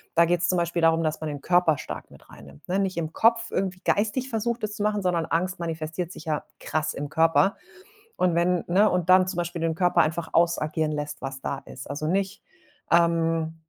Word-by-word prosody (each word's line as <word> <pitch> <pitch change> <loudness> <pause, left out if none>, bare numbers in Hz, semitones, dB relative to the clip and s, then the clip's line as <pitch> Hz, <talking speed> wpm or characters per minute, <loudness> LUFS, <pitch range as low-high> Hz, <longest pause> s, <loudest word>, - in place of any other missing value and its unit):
Da 170 0 +6
geht's 175 0 +1
zum 180 - +2
Beispiel 170 0 0
darum, 165 0 +4
dass 155 -1 -2
man 155 - -3
den 145 -1 -5
Körper 175 -4 +3
stark - - -8
mit - - -18
rein - - -14
nimmt, 70 0 -16
ne 185 - 0
nicht 195 -2 -1
im 160 -1 -3
Kopf 230 0 +3
irgendwie 185 -1 -2
geistig 220 +6 0
versucht 235 0 -2
es 210 0 -6
zu 205 - -3
machen, 210 -1 +1
sondern 175 -3 0
Angst 185 +4 -1
manifestiert 165 +1 -4
sich - - -11
ja 155 -2 -1 0.2
krass 155 0 -2
im 145 - -4
Körper 165 +6 +3 0.6
und 180 -2 +1
wenn 175 0 +2
ne 195 +5 +4
und 180 -2 0
dann 185 0 +6
zum 185 -1 -4
Beispiel 175 0 -3
den 165 -1 0
Körper 180 +1 +3
einfach 160 +1 -2
ausagieren 160 -2 +1
lässt, 150 0 -5
was 135 0 -5
da 135 - -3
ist. 130 - -10
Also 145 +2 -3
nicht, 190 +3 -1 0.5
ähm, 165 -1 +2
170 Hz, 215 wpm, -25 LUFS, 160-185 Hz, 0.6 s, Da